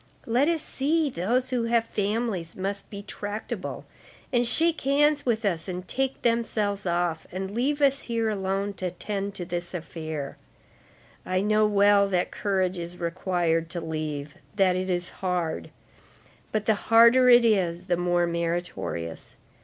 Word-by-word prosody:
Let 250 +7 +2
us 325 -2 0
see, 295 +2 0
those 245 +7 0
who 245 -2 0
have 230 0 +2
families 205 -5 -2
must 195 +1 -4
be 200 -1 -7
tractable, 205 +1 -5 0.5
and 240 -1 +3
shake 325 +6 +4
hands 290 +1 +2
with 225 -2 +1
us 170 -4 -1
and 180 0 -5
take 265 +4 -2
themselves 215 -4 0
off, 170 -1 -1
and 190 +1 -4
leave 280 +7 0
us 275 0 +3
here 230 -1 -1
alone 195 -1 -1
to 185 - -2
attend 200 +2 -4
to 175 - -5
this 175 0 -4
affair. 155 -4 -5 0.9
I 185 0 0
know 215 +1 +3
well 205 -1 +4
that 180 -2 0
courage 190 -3 -1
is 170 +1 -6
required 170 -1 0
to 170 - -4
leave, 155 -3 -4 0.2
that 190 -3 +3
it 185 +1 -2
is 175 -1 -1
hard; 180 -4 -2 0.8
but 215 -1 -1
the 220 - +4 0.2
harder 235 +3 +7
it 240 -1 +7
is, 180 -6 +1
the 175 - +1
more 175 0 +1
meritorious. 170 - -3
195 Hz, 155 wpm, -26 LUFS, 175-230 Hz, 0.9 s, harder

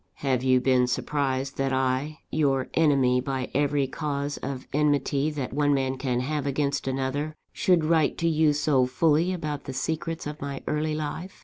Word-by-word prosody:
Have 130 -2 +2
you 130 -1 +4
been 125 -1 +3
surprised 135 +1 -1
that 135 0 0
I, 130 +3 -1
your 135 -4 +1
enemy 135 -5 +3
by 130 -1 -3
every 145 0 +2
cause 145 +1 -3
of 135 -1 -5
enmity 145 0 +1
that 145 -5 -4
one 145 0 +2
man 135 -1 0
can 125 -2 0
have 145 +1 -2
against 140 0 -1
another, 135 +3 -2 0.2
should 175 -4 +2
write 160 -2 +2
to 170 - 0
you 155 -1 +3
so 145 -3 +2
fully 160 +6 +2
about 150 -5 -4
the 135 - -5
secrets 160 +4 -3
of 150 +1 -6
my 140 -1 -5
early 155 0 0
life? 155 +5 -5
140 Hz, 175 wpm, -26 LUFS, 130-150 Hz, 0.2 s, you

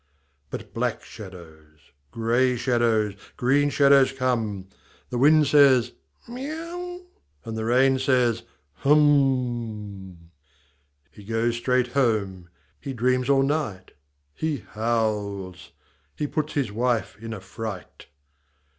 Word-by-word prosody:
But - - -8
black - - -2
shadows, 80 -7 -12 0.3
grey 120 - +1
shadows, 115 -4 +1 0.2
green 140 +4 +2
shadows 140 -2 +5
come. 115 -7 -2 0.5
The 120 - -2
wind 150 +3 +5
says, 135 -4 +5 0.2
" - - -32
Miau! 335 +8 -6 0.2
" 70 0 -40
and 115 - -5
the 110 0 -3
rain 130 +3 +3
says, 125 -3 +2 0.2
« 70 -1 -45
Hum! 120 - +1 0.4
" 70 0 -42
He 105 - -14
goes 115 +2 -1
straight 125 +1 +1
home. 105 -9 0 0.3
He 135 - -6
dreams 125 +2 +1
all 135 -1 +4
night. 135 -10 -2 0.4
He 145 - -3
howls. 105 -5 -2 0.4
He 150 - -2
puts 155 +1 -3
his 135 -7 -1
wife 120 +1 -1
in 115 +1 -7
a 110 - -5
fright. 100 0 -8
120 Hz, 120 wpm, -24 LUFS, 105-135 Hz, 0.5 s, shadows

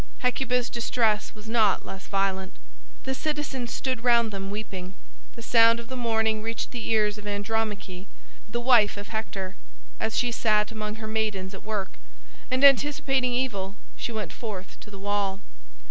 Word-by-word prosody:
Hecuba's 250 -1 +1
distress 225 -3 +1
was 215 0 -12
not 225 -1 +3
less 190 0 -8
violent. 195 -1 0 0.5
The 265 - -1
citizens 280 -4 -2
stood 255 -3 -2
round 235 -2 +4
them 195 -1 -4
weeping. 195 -3 -5 0.4
The 230 - -9
sound 230 0 +6
of 235 - -9
the 260 - -4
mourning 220 -3 +1
reached 225 +1 -3
the 240 -3 -4
ears 210 -1 +2
of 210 - -9
Andromache, 205 -2 -2 0.4
the 240 +2 -1
wife 240 -5 +5
of 205 +2 -7
Hector, 200 -4 -4 0.4
as 220 - -1
she 245 -1 +2
sat 215 -2 +2
among 215 -1 -4
her 220 -1 -6
maidens 210 -3 -1
at 195 - -8
work, 210 -3 -4 0.5
and 255 +1 +1
anticipating 270 -2 +4
evil 205 -7 -1 0.2
she - - -4
went 215 -6 -4
forth 200 -5 -6
to - - -12
the 200 - -10
wall. 200 -1 -1
220 Hz, 160 wpm, -27 LUFS, 205-240 Hz, 0.5 s, sound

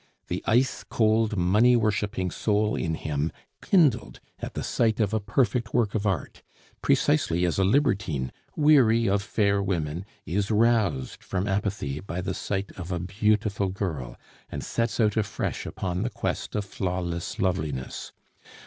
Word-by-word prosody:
The - - -2
ice 125 +3 +2
cold, 110 -1 +2
money 105 +8 +4
worshiping 105 -4 0
soul 105 0 +1
in 80 -1 -1
him 75 0 -2 0.3
kindled 150 - +2 0.2
at - - -6
the - - -3
sight 110 -2 +1
of 105 -1 +1
a 110 - +2
perfect 115 +3 0
work 115 -4 +2
of 105 -1 0
art, 95 -7 -2 0.4
precisely 85 +3 +2
as 85 +2 0
a - - +4
libertine, 95 - +1 0.2
weary 130 -7 +5
of 100 +1 +2
fair 100 -1 +1
women, 85 -3 -2 0.2
is 95 +5 -1
roused 105 - +1
from 95 +1 -2
apathy 95 -8 -1
by 90 -1 -5
the 90 - -2
sight 100 0 -3
of 90 0 -6
a 90 - 0
beautiful 100 +2 +1
girl, 80 -11 -4 0.3
and - - -5
sets 115 0 -1
out 110 -1 +3
afresh 105 -2 -2
upon 90 -1 -3
the 120 - 0
quest 110 - -3
of 105 -1 -1
flawless 90 -3 -3
loveliness. 75 -8 -2
100 Hz, 150 wpm, -26 LUFS, 90-110 Hz, 0.4 s, weary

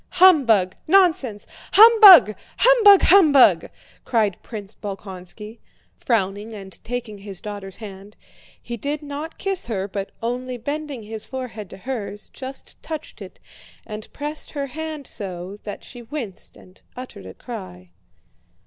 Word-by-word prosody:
"Humbug! 240 - +5
Nonsense! 315 - +2 0.3
Humbug, 420 - +9 0.2
humbug, 450 -5 +6
humbug!" 310 -9 +5 0.3
cried 215 -6 0
Prince 210 -3 -9
Bolkónski, 200 +2 -9 0.4
frowning 205 -1 -2
and 195 -3 -11
taking 230 -4 -6
his 195 -2 -8
daughter's 200 -2 -8
hand; 200 -1 -11 0.4
he 235 - -7
did 290 +6 -4
not 295 +3 -7
kiss 390 - -1
her, 200 -4 -3
but 195 0 -5
only 250 +2 -3
bending 285 0 -5
his 220 0 -7
forehead 230 -7 -7
to - - -11
hers 210 -1 -6
just 265 0 -9
touched 315 -2 -8
it, - - -11 0.5
and 215 0 -9
pressed 295 +1 -4
her 285 -2 -3
hand 310 +1 -7
so 190 -3 -6
that 205 - -7
she 245 - -11
winced 235 -6 -8
and 185 +1 -19 0.2
uttered 250 - -10
a 95 - -11
cry. 140 - -10
230 Hz, 130 wpm, -22 LUFS, 200-290 Hz, 0.5 s, Humbug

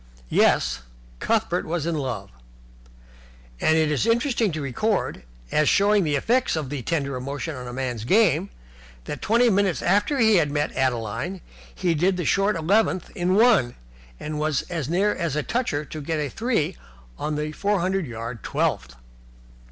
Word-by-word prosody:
Yes, 60 0 +3 0.4
Cuthbert - - 0
was 165 -1 -3
in 170 - -1
love: 135 -5 -4 1.3
and 160 - +3
it 155 -1 +2
is 150 - 0
interesting 235 -2 +2
to 155 - -3
record, 150 - -1 0.3
as 150 -1 +3
showing 205 0 +4
the 150 -3 0
effect 235 - +1
of 150 -4 -4
the 145 -3 -3
tender 140 -1 -2
emotion 140 +4 -4
on 125 -1 -7
a - - -6
man's 125 -3 -3
game, 190 - +3 0.5
that - - -6
twenty 235 +3 +3
minutes 195 -3 +1
after 205 +10 +2
he 220 -4 +5
had 155 -4 +2
met 145 +1 -1
Adeline 130 - -1 0.4
he 180 -2 +1
did 180 +4 +1
the 175 - -2
short 195 +1 +2
eleventh 185 +2 +1
in 180 +2 0
one, 210 - +4 0.4
and 150 0 -4
as 155 0 -2
near 195 +5 +2
as 170 -5 -2
a 150 - 0
toucher 225 - -1
got 155 +2 -4
a 150 -2 -2
three 195 - -1 0.4
on 150 0 -2
the 150 +1 -2
four 200 +5 0
hundred 185 -1 -1
yard 115 -1 -6
twelfth. 60 -1 -1
160 Hz, 160 wpm, -24 LUFS, 140-200 Hz, 1.3 s, he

